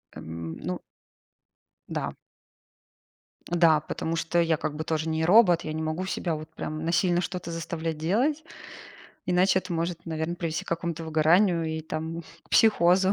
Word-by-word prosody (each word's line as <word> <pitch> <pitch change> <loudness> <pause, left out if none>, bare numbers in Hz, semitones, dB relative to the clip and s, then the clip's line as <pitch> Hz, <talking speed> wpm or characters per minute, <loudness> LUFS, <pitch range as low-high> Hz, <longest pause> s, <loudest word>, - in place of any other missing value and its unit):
Эм, 80 0 -6
ну 90 - -4 1.1
Да. - - -3 1.3
Да, 165 -3 +4
потому 160 +2 -3
что 165 +1 0
я 165 -1 +2
как 150 - -3
бы 155 - -3
тоже 160 0 -1
не 160 0 0
робот. 180 -2 +6
Я 155 - -4
не 160 - -3
могу 160 +4 -2
себя 175 -3 -2
вот 155 +1 -8
прям, 155 +1 -4
насильно 175 +1 +2
что-то 180 -2 -4
заставлять 165 -1 -3
делать, 245 - +1 0.8
иначе 185 +1 +4
это 185 -1 -5
может, 170 +1 -3
наверно, 160 +1 -2
привести 165 -2 -3
к - - -22
какому-то 170 -1 -2
выгоранию 165 +3 +3
и 160 0 -2
там, 160 +1 -4 0.3
психозу. 190 -3 +5
165 Hz, 150 wpm, -27 LUFS, 160-175 Hz, 1.3 s, робот